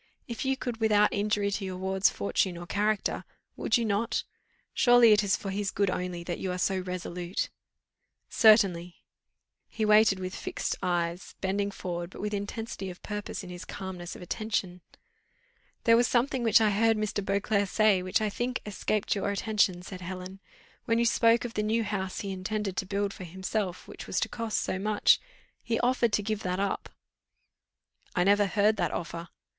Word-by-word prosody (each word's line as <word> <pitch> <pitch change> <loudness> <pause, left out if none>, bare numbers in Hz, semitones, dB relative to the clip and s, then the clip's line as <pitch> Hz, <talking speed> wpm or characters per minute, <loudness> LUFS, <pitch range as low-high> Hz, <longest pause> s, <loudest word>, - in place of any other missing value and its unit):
If 235 +2 -4
you 265 0 +1
could 245 -3 -4
without 210 -2 +3
injury 205 0 0
to 200 0 -2
your 185 -1 -4
ward's 190 +1 +2
fortune 100 - -1
or 175 - -7
character, 210 +2 0 0.3
would - - +1
you 235 - -1
not? 215 +2 0 0.5
Surely 245 -2 +6
it 210 0 +5
is 195 -2 +2
for 195 - -5
his 200 0 -1
good 200 -1 +1
only 180 -1 -3
that 175 0 -4
you 185 - -2
are 180 - -3
so 190 +1 +1
resolute?" 180 0 -4 0.8
"Certainly!" 185 -6 +4 0.7
He 220 - -2
waited 210 -2 +5
with 185 0 -5
eyes - - -6 0.8
fixed, - - -14
bending 200 +1 0
forward, 175 -3 -5
but - - -12
with 210 +1 -3
intensity 205 -1 -4
of 180 - -11
purpose 210 -1 -5
in 180 - -8
his 175 0 -7
calmness 185 -2 -7
of - - -9
attention. 190 -2 -3 1.0
"There 230 -1 +6
was 240 +1 +4
something 250 +1 +1
which 230 -1 +5
I 215 -1 +4
heard 225 +2 +3
Mr. 215 -1 -2
Beauclerc 200 +1 0
say, 215 -3 +3
which, 185 +3 0
I 215 - +1
think, 245 +4 -2
escaped 210 0 -1
your 200 0 -1
attention," 200 -3 +1
said 185 0 -8
Helen. 185 +1 -7 0.5
"When 230 -2 +2
you 235 - +2
spoke 230 0 +4
of 235 - -5
the 210 - 0
new 220 +2 +1
house 190 -3 -3
he 200 - -4
intended 195 +1 -3
to 190 - -2
build 200 0 -1
for - - -9
himself, 185 +1 -3
which - - -9
was - - 0
to - - 0
cost 230 -2 -2
so 185 - -2
much, 210 +1 +4 0.4
he 230 -1 -1
offered 245 -2 +2
to 210 - +2
give 215 0 -2
that 180 -1 -2
up." 200 0 -2 1.3
"I 180 - +3
never 205 +1 +4
heard 210 +2 +2
that - - +1
offer." 170 0 -5
200 Hz, 185 wpm, -28 LUFS, 185-215 Hz, 1.3 s, Surely